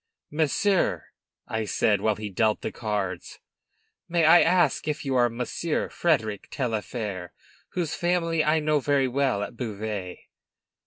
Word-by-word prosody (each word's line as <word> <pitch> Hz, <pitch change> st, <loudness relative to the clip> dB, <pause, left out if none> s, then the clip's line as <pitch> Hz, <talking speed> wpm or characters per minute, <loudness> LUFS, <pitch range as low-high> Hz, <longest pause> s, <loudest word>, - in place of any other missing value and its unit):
"Monsieur," 160 Hz, +6 st, +1 dB, 0.4 s
I 110 Hz, -1 st, -2 dB
said, 105 Hz, 0 st, +1 dB
while 110 Hz, 0 st, +2 dB
he 105 Hz, -1 st, -6 dB
dealt 110 Hz, +2 st, +1 dB
the -, -, -3 dB
cards, 100 Hz, -5 st, -3 dB, 0.7 s
"may 170 Hz, -1 st, +2 dB
I 170 Hz, +2 st, +8 dB
ask 175 Hz, -5 st, +2 dB
if 150 Hz, -1 st, -2 dB
you 135 Hz, -1 st, 0 dB
are 120 Hz, -1 st, +4 dB
Monsieur 125 Hz, +7 st, -2 dB
Frederic 110 Hz, -, 0 dB
Taillefer, 110 Hz, -, -3 dB, 0.4 s
whose 170 Hz, -4 st, -2 dB
family 165 Hz, -2 st, +1 dB
I 155 Hz, +1 st, +3 dB
know 150 Hz, 0 st, +2 dB
very 140 Hz, -1 st, +2 dB
well 130 Hz, -5 st, 0 dB
at 120 Hz, -, -7 dB
Beauvais?" 105 Hz, -5 st, -5 dB
125 Hz, 140 wpm, -26 LUFS, 105-155 Hz, 0.7 s, I